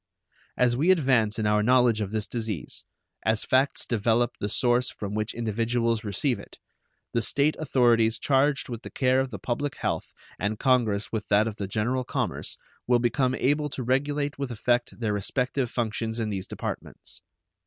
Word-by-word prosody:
As 120 -1 +3
we 155 +8 +2
advance 130 - +3
in 110 - -1
our 105 0 +3
knowledge 120 -1 +4
of 100 -2 -3
this 110 -1 -1
disease, 110 -6 -4 0.4
as 110 0 +1
facts 130 +2 +2
develop 115 +1 +2
the 105 - -2
source 125 +3 +2
from 100 -1 -6
which 110 +1 -2
individuals 115 0 0
receive 110 +5 0
it, - - -13 0.6
the 115 - +2
State 140 +6 +1
authorities 120 -6 +3
charged 140 0 +2
with 120 -2 -6
the - - -8
care 130 0 +2
of 135 0 0
the 105 - -6
public 125 +7 -2
health, - - -2 0.3
and 105 +2 -1
Congress 115 -6 +1
with 110 -2 -3
that 105 +1 +4
of 110 -1 -5
the 100 - -3
general 115 +6 0
commerce, - - -3 0.3
will 125 0 +5
become 125 +2 +1
able 145 +3 +1
to 135 - -4
regulate 145 +3 0
with 140 -2 -2
effect 120 +2 0
their 110 -3 0
respective 125 +5 -1
functions 115 -1 -2
in 110 -1 -1
these 95 -3 -4
departments. - - -6
120 Hz, 175 wpm, -26 LUFS, 110-130 Hz, 0.6 s, will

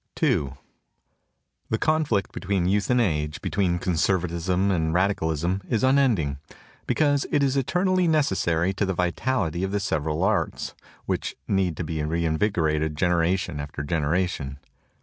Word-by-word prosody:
II 70 -2 +2 1.2
THE 110 - +1
conflict 150 - +1
between 95 -2 -1
youth 100 0 +1
and 125 0 +3
age, 75 -9 0
between 90 -3 0
conservatism 90 +1 0
and 80 -3 0
radicalism, 90 -1 0
is 115 -1 0
unending, 120 - +2 0.5
be - - +1
cause 145 -2 +2
it 145 - +2
is 135 -1 +1
eternally 180 +6 +1
necessary 95 - +1
to 100 +1 0
the 95 - -1
vitality 90 -1 -1
of 95 - 0
the 100 +1 -1
several 80 -2 -1
arts, 105 +2 0 0.3
which - - -2
need 95 -5 0
to - - -2
be 80 -1 -3
reinvigorated 80 -1 0
generation 90 -1 +1
after 75 0 -5
generation. 75 -2 -1
90 Hz, 135 wpm, -25 LUFS, 80-105 Hz, 1.2 s, and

